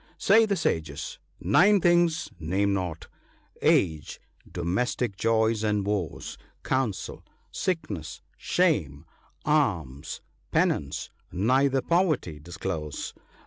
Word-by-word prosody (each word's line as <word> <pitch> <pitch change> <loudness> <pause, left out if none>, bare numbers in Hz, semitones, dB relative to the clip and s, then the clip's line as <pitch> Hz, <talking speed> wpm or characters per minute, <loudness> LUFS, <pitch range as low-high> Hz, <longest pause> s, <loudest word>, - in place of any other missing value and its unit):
— - - -30
" - - -33
Say 220 +2 +7
the 200 - +1
sages, 80 - -2 0.2
nine 195 - +5
things 175 -2 +3
name 95 +5 +1
not: 90 -4 -3 0.5
Age, 80 -4 +2 0.3
domestic 100 +5 -1
joys 110 +1 +2
and 105 -2 +1
woes, 100 -7 -3 0.2
Counsel, 130 -7 -2 0.3
sickness, 110 - -3
shame, 85 - 0 0.4
alms, 85 - 0 0.3
penance; 70 -1 0 0.2
neither 130 +7 +2
poverty 155 - +1
disclose. 80 -1 -5
105 Hz, 100 wpm, -27 LUFS, -, 0.5 s, Say